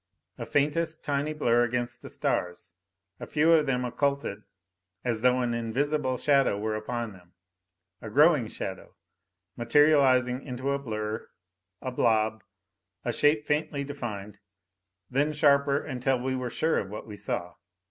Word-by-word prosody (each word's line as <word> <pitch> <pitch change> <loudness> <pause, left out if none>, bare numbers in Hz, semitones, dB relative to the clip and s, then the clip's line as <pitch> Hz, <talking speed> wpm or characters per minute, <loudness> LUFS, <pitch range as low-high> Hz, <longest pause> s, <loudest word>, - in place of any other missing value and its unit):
A 115 - -5
faintest, 155 +3 0
tiny 145 +1 -1
blur 120 -6 +2
against 120 0 -2
the - - -9
stars, 90 -1 -2 0.5
a - - -7
few 160 +2 +3
of 155 -3 +4
them 125 -1 0
occulted 140 -5 -1 0.6
as 115 -3 -1
though 125 +1 +3
an 120 -1 0
invisible 130 +4 -1
shadow 135 -6 +3
were 110 +1 -2
upon 115 +1 -4
them. 90 -2 -18 0.7
A 110 - -7
growing 145 0 +4
shadow, 95 -3 -7 0.6
materializing 130 0 +4
into 130 0 -3
a 140 - 0
blur 110 -4 -4 0.5
a 130 - -3
blob, 110 -3 +1 0.6
a 120 - 0
shape 150 +2 +3
faintly 150 -1 -1
defined. 105 -8 -6 0.7
Then 145 +4 +1
sharper 140 -2 +4
until 130 -2 0
we 130 +1 -2
were 130 -1 -3
sure 160 +7 +1
of 95 - -5
what 105 +1 -7
we 105 - -9
saw. 90 -2 -4
125 Hz, 145 wpm, -28 LUFS, 110-145 Hz, 0.7 s, of